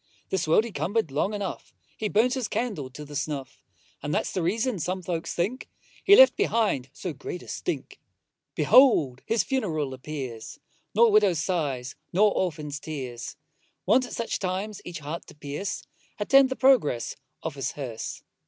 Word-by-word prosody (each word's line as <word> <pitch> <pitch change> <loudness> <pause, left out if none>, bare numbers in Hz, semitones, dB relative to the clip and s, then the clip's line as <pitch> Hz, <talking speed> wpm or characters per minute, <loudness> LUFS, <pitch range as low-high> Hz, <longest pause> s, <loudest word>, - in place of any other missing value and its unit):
This 190 -4 0
world 165 +7 +5
he 235 - -6
cumber'd 175 +2 -1
long 150 +8 0
enough; 200 -2 -5 0.2
He 215 - -2
burnt 230 +5 +3
his 260 -4 -1
candle 210 - -2
to 150 +3 -9
the 145 0 -10
snuff; 140 -3 -4 0.4
And 145 - -3
that's - - 0
the 185 - -1
reason, 220 +5 0
some 185 +3 -2
folks 170 -2 -3
think, 210 +10 -2 0.3
He 405 - +8
left 260 -5 +8
behind 205 - +1
so 165 +4 -5
great 145 +6 -7
a - - -14
stink. - - -4 0.6
Behold 150 - +5
his 225 0 +2
funeral 160 - -1
appears, 130 -4 -7 0.4
Nor 230 +1 +6
widow's 205 -5 +4
sighs, 145 -6 -2 0.2
nor 205 +3 +4
orphan's 150 -5 -2
tears, 130 -7 -6 0.5
Wont 255 -1 +4
at - - -9
such 230 - -2
times 195 +2 -3
each 175 - -6
heart 150 +4 -6
to - - -13
pierce, 150 +6 -4 0.3
Attend 270 +5 +5
the 260 - -2
progress 245 - +3 0.3
of - - -3
his 135 -1 -3
hearse. 125 -6 -6
175 Hz, 165 wpm, -26 LUFS, 145-215 Hz, 0.6 s, He